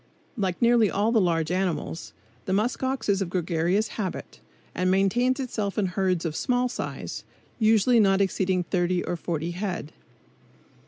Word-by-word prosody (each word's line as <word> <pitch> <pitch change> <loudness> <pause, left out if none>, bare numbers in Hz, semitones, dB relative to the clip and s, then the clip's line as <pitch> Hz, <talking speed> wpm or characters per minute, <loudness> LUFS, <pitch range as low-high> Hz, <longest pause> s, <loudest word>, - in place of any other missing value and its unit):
Like 190 -6 -2
nearly 235 -3 +5
all 210 +3 +1
the 225 -3 +4
large 165 -2 +1
land 185 +1 +1
animals, 165 -3 -3 0.3
the 190 - -1
musk 215 +5 0
ox 265 0 -2
is 200 -1 +2
of 185 - -2
gregarious 175 +3 0
habit, 190 -4 -4 0.3
and 185 +1 0
maintains 235 +8 +2
itself 215 -6 -3
in 210 - +2
herds 185 -1 0
of 155 -2 -2
small 250 +3 +1
size, 245 - -5 0.4
usually 225 +2 +4
not 195 -2 +4
exceeding 190 -2 +1
thirty 175 0 0
or - - -2
forty 165 -1 -3
head. 175 -4 -4
190 Hz, 160 wpm, -26 LUFS, 175-220 Hz, 0.4 s, nearly